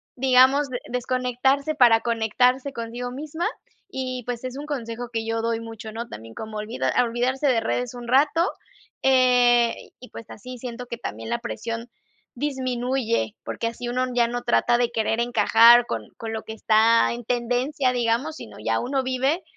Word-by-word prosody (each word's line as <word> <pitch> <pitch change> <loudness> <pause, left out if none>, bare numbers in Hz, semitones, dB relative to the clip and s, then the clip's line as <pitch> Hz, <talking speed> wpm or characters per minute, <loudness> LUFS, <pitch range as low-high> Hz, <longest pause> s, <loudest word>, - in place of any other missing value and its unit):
digamos, 265 +2 +4
de 245 - -4
desconectarse 255 +4 0
para 235 -5 +5
conectarse 250 +4 +1
consigo 240 +1 -5
misma 310 +5 -4 0.4
y, 255 -6 -4
pues, 245 0 -4
es 255 +1 -5
un 290 - -6
consejo 240 -5 -5
que 225 -1 -2
yo 225 0 -1
doy 230 0 0
mucho, 225 -1 -8
¿no? 230 +2 -6
También 115 +1 -10
como 220 -1 -7
olvida 130 - -2
olvidarse 250 +4 0
de 235 -3 +3
redes 245 +1 -2
un 240 -1 -8
rato, 295 +7 +3 0.5
eh, 245 -2 +4 0.2
y 250 - -13
pues, 230 - -10
así 250 +4 -9
siento 245 0 -7
que 235 - -5
también 110 - -6
la - - 0
presión 230 0 -5 0.5
disminuye, 255 -4 -1
porque 230 - -3
así 240 +1 -5
uno 255 +1 0
ya 240 -1 +3
no 245 +1 -3
trata 115 - +2
de 240 - +2
querer 225 0 0
encajar 235 0 +6
con 115 - -3 0.2
con 225 -1 -5
lo 220 - -3
que 220 - -7
está 225 +1 +3
en 240 -1 -8
tendencia, 250 +3 0
digamos, 245 +6 0
sino - - -11
ya - - +1
uno 265 +2 -1
vive 265 +7 0
245 Hz, 170 wpm, -24 LUFS, 230-255 Hz, 0.5 s, encajar